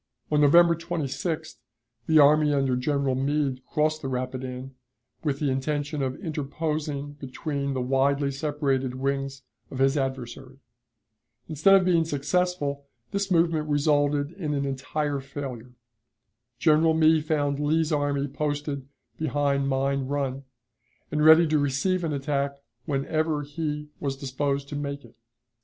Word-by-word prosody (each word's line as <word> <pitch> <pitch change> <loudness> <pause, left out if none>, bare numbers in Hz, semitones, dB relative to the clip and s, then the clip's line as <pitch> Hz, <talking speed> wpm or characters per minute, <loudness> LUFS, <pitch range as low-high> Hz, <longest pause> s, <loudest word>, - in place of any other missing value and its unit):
On 150 -1 +3
November 170 +4 +6
26th 160 -1 -3 0.5
the 160 - +4
army 150 +1 +6
under 135 -3 +1
General 140 +1 0
Meade 135 -1 -1
crossed 155 0 0
the 135 - -4
Rapidan, 130 0 -4 0.5
with 145 -4 0
the 140 -2 0
intention 145 +2 -2
of 130 -1 -1
interposing 150 -2 -3
between 140 0 -3
the 130 - -1
widely 140 +2 +1
separated 135 -2 -1
wings 135 0 -2 0.3
of 135 - -7
his 135 +1 +3
adversary. 130 -1 -4 0.9
Instead 160 +5 +5
of 190 -2 +4
being 170 -3 +3
successful, 145 -1 -1 0.2
this 200 0 -1
movement 165 -3 +2
resulted 145 0 +2
in 155 -5 -3
an 140 0 -1
entire 140 +2 -2
failure. 130 -3 -7 0.8
General 160 +2 +4
Meade 160 -1 +4
found 145 -3 0
Lee's 155 +2 +1
army 145 -1 0
posted 145 -1 -3 0.3
behind 140 -2 0
Mine 135 0 0
Run, 135 -1 -2 0.7
and 150 0 +1
ready 160 +2 +8
to 155 -1 +2
receive 145 +7 0
an 160 - -1
attack 140 0 -1 0.3
whenever 155 +1 -1
he 150 0 -4
was 135 -2 -3
disposed 140 +1 -2
to - - -5
make 140 -2 -4
it. 115 - -18
145 Hz, 135 wpm, -26 LUFS, 135-155 Hz, 0.9 s, ready